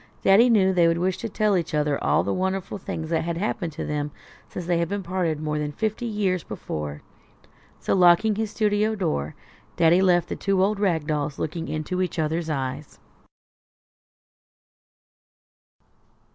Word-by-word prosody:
Daddy 215 +6 +6
knew 190 -5 +4
they 175 -2 +4
would 165 0 +2
wish 180 +1 -1
to 230 - -4
tell 210 0 +1
each 170 -4 -1
other 150 -1 0
all - - +3
the 100 - -1
wonderful 190 +1 -2
things 160 -3 -5
that 165 - +1
had 170 0 -3
happened 180 -2 -2
to - - -5
them 150 0 -2 0.4
since 180 - -6
they 175 -1 +1
had 195 +4 -2
parted 175 -4 -1
more 150 0 -2
than 150 0 -2
fifty 220 +8 -2
years 195 -6 -1
before. 75 -1 -6 0.8
So, - - -1
locking 185 +4 +5
his 220 +1 -2
studio 210 0 +1
door, 75 - -2 0.4
Daddy 170 +2 +4
left 175 -2 +3
the - - -3
two 195 -2 +1
old 205 +1 +1
rag 170 -7 +1
dolls 150 -2 -2
looking 165 +1 -4
into 155 +4 -3
each 185 -1 -2
other's 160 +1 -1
eyes. 135 0 -4
175 Hz, 160 wpm, -24 LUFS, 155-195 Hz, 0.8 s, Daddy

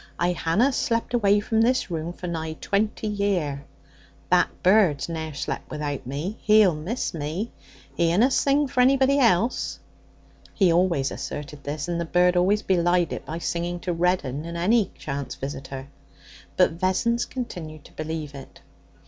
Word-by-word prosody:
'I 175 +1 +1
hanna 180 +10 +2
slep 235 -3 -1
away 205 -4 +4
from 220 +2 +1
this 245 -4 +1
room 165 0 -3
for 175 - -9
nigh 160 -2 -3
twenty 210 +6 -1
year. 190 -9 -1 0.7
That - - +4
bird's 185 -7 +4
ne'er 160 -3 -5
slep 140 - -3
without 145 -4 -4
me. 150 - -4
He'll 210 -4 +5
miss 175 +12 -3
me. 165 +8 -3 0.4
He 170 -1 +2
unna 230 +10 +4
sing 280 +2 +2
for 250 -1 +1
anybody 270 +2 +4
else.' 230 -1 +2 0.8
He 185 -4 +4
always 170 -6 +2
asserted 145 -1 -6
this, 145 +1 -4
and 170 -1 -1
the - - -2
bird 180 +2 +3
always 195 +4 +2
belied 175 -1 +2
it - - -7
by 160 - -4
singing 175 +1 -2
to 180 - -2
Reddin 165 -5 0
and 170 +1 -6
any 205 +4 +2
chance 140 -2 -5
visitor. 135 -1 -6 0.7
But - - +5
Vessons 235 +6 +1
continued 170 - -7
to - - -15
believe 155 -1 -5
it. 135 -1 -11
175 Hz, 155 wpm, -25 LUFS, 155-210 Hz, 0.8 s, He'll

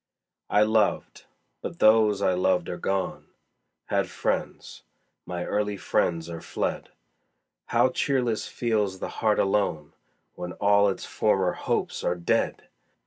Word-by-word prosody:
I 105 - +4
loved 110 -1 0 0.4
but - - -6
those 110 -2 +4
I 95 - +3
loved 90 -1 +1
are 90 - -4
gone; 95 0 -2 0.6
Had - - 0
friends - - -3 0.5
my 90 -1 -4
early 105 -1 -1
friends 85 -2 0
are 85 -1 -7
fled: - - -3 0.8
How 120 +2 +3
cheerless 125 -4 0
feels 105 -5 -1
the - - -5
heart 110 -2 +3
alone 95 -7 0 0.4
When 90 0 -6
all 100 0 +3
its 95 - -4
former 95 -4 +1
hopes - - -2
are 90 - +1
dead! 85 -1 0
100 Hz, 130 wpm, -26 LUFS, 90-110 Hz, 0.8 s, I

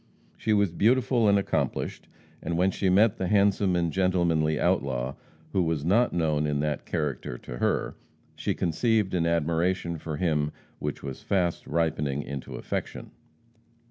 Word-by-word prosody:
She 110 - -2
was 100 -4 +3
beautiful 115 +4 +3
and 100 - +5
accomplished, 100 - -2 0.3
and 85 0 -2
when 95 +2 +3
she 95 - 0
met 100 +4 +4
the 95 - -1
handsome 100 -2 +3
and 85 -2 0
gentlemanly 85 -5 +2
outlaw, 65 -1 0 0.4
who 95 - +3
was 80 -4 -1
not 115 +8 +3
known 75 -3 +1
in 75 -1 0
that 75 -2 -2
character 75 -6 -3
to - - -8
her, - - 0 0.4
she - - -2
conceived 105 +4 +1
an 85 -2 +1
admiration 85 +1 0
for 80 -1 -5
him 75 -4 0 0.3
which - - -4
was 70 -2 -6
fast 90 -4 0
ripening 75 -3 0
into 70 -1 -6
affection. - - -5
85 Hz, 150 wpm, -27 LUFS, 75-95 Hz, 0.4 s, and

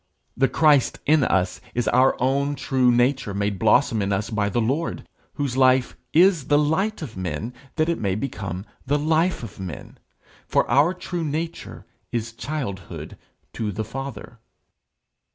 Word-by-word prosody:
The 135 +1 +3
Christ 150 -4 +3
in 155 -1 +4
us 90 -5 0
is 120 -1 0
our 130 +2 +3
own 140 +3 +1
true 130 -3 +2
nature 120 -3 +1
made 100 -1 -1
blossom 110 +1 +3
in 100 0 -1
us 100 +3 -1
by 105 -2 0
the 110 - 0
Lord, 135 +9 -1 0.3
whose 140 -4 -2
life 130 -1 +3 0.2
is 175 -3 +4
the 145 - +4
light 165 +7 0
of 125 -7 -8
men 95 +6 -4 0.2
that 155 -1 +1
it 170 - 0
may 100 -3 0
become 100 -5 -4 0.2
the 145 +2 +1
life 160 +2 +1
of 110 - -9
men; 90 -5 -8 0.5
for - - +2
our 155 +7 +3
true 175 -1 -4
nature 160 +2 -4 0.3
is 115 -1 -3
childhood 115 - -5 0.4
to 110 -2 -2
the 110 +3 -4
Father. 135 0 -7
130 Hz, 155 wpm, -23 LUFS, 110-150 Hz, 0.5 s, in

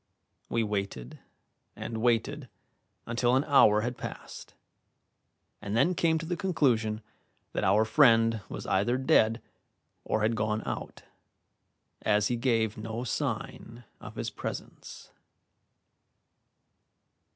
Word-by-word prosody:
We 115 - +1
waited 100 - -4 0.6
and 115 -1 -5
waited 125 +4 0 0.6
until 120 +1 +1
an 135 - +3
hour 110 -8 +5
had 120 +2 -4
passed, - - -8 1.1
and 100 +2 -2
then 175 +9 +3
came 165 -2 +2
to 160 - -5
the 175 +2 -2
conclusion 120 - +1 0.5
that - - -1
our 105 +3 +4
friend 115 -4 +4
was - - -6
either 105 +6 +1
dead 115 -3 +3 0.6
or 110 - -1
had 115 +1 +2
gone 110 0 -1
out, - - -6 1.0
as 105 -1 +2
he 120 - 0
gave 115 -3 0
no 110 +2 -4
sign 120 0 -4 0.2
of - - -10
his - - -4
presence. - - -8
115 Hz, 115 wpm, -29 LUFS, 110-125 Hz, 1.1 s, hour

